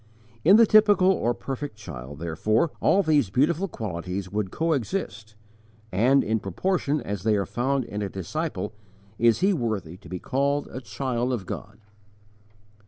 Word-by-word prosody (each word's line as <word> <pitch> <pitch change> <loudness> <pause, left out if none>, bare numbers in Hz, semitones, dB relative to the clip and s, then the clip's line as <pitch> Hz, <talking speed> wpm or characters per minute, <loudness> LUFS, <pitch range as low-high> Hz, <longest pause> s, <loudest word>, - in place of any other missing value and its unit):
In 190 +6 +7
the 230 +1 +8
typical 205 -3 +5
or 120 -10 0
perfect 135 -2 -5
child, 70 -9 -9
therefore, 105 - 0
all 200 - +3
these 150 - +2
beautiful 155 - +1
qualities 95 - -5
would 105 -2 -1
coexist, 120 - -2 0.6
and, 125 +8 +4
in 110 +1 0
proportion 150 - -1
as 100 -2 -4
they 110 +1 +2
are 100 -1 0
found 130 +5 -1
in 105 -2 -5
a 100 - -2
disciple, 105 - -4 0.5
is 115 +3 +4
he 195 +2 +4
worthy 105 - -3
to 95 -3 -15
be 90 - -4
called 140 +7 0
_a 130 - -7
child 120 +2 -2
of 115 -7 -3
God. 100 +4 -7
115 Hz, 155 wpm, -25 LUFS, 100-150 Hz, 0.6 s, the